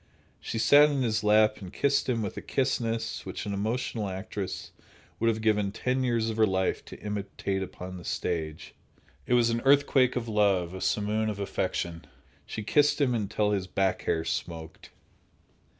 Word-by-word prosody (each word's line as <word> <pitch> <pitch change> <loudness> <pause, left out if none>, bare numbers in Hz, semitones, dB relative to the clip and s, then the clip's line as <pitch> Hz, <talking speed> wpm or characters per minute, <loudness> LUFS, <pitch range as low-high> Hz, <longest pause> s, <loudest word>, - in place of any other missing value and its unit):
She 115 - -5
sat 145 +6 +6
in 140 -3 0
his 110 -2 0
lap 105 0 +4
and 95 -2 -8
kissed 140 -1 +1
him 115 -3 0
with 100 - -4
a - - -5
kissness 115 -4 -1
which - - -6
an 100 - -3
emotional 110 0 -2
actress 95 0 -5 0.5
would 115 - +1
have 110 -1 +1
given 105 -2 +2
ten 125 +4 -1
years 115 -2 +1
of 110 - -6
her 110 -1 +5
life 95 -1 0
to - - -11
imitate 100 -1 -3
upon 90 -1 -7
the 90 - -10
stage. 85 -3 -3 0.5
It 125 - +3
was 120 -1 +4
an 115 0 -1
earthquake 135 -2 +4
of 120 -2 -2
love, 100 -5 +2
a 95 - -7
simoon 105 +1 0
of 105 -1 -4
affection. 85 -3 -3 0.4
She 110 - -5
kissed 145 +8 +3
him 135 -4 +2
until 105 -1 0
his 95 -2 -1
back 95 0 0
hair 80 0 0
smoked. 80 -2 -5
110 Hz, 175 wpm, -28 LUFS, 95-115 Hz, 0.5 s, sat